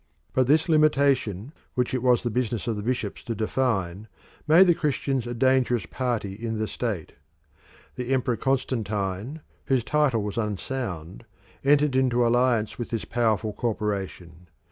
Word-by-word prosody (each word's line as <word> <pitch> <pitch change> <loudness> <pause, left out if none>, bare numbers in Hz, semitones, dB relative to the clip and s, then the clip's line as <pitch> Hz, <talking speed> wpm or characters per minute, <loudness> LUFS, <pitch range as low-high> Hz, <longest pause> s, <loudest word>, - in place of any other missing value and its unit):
But 130 -1 +2
this 155 +5 +3
limitation, 140 - +2 0.2
which 125 -1 0
it 130 - 0
was 125 -1 +3
the 120 - -1
business 120 -2 -1
of 115 - -1
the 105 - -4
bishops 115 -2 -3
to 115 - -3
define, 105 -4 -1 0.4
made 165 +5 +7
the 175 - +5
Christians 140 -6 -1
a 120 - -4
dangerous 130 -1 +2
party 120 -6 -2
in 110 +2 -4
the 110 0 -1
state. 105 -10 -3 0.9
The 125 +1 -3
Emperor 125 -2 +1
Constantine, 115 -1 -2 0.2
whose 130 -3 +1
title 135 -4 +1
was 105 +2 -3
unsound, 105 -4 -4 0.4
entered 145 0 +3
into 125 -2 +3
alliance 120 -2 +2
with 120 - -4
this 115 -2 -3
powerful 110 -3 0
corporation. 100 -6 -4
120 Hz, 145 wpm, -25 LUFS, 105-130 Hz, 0.9 s, made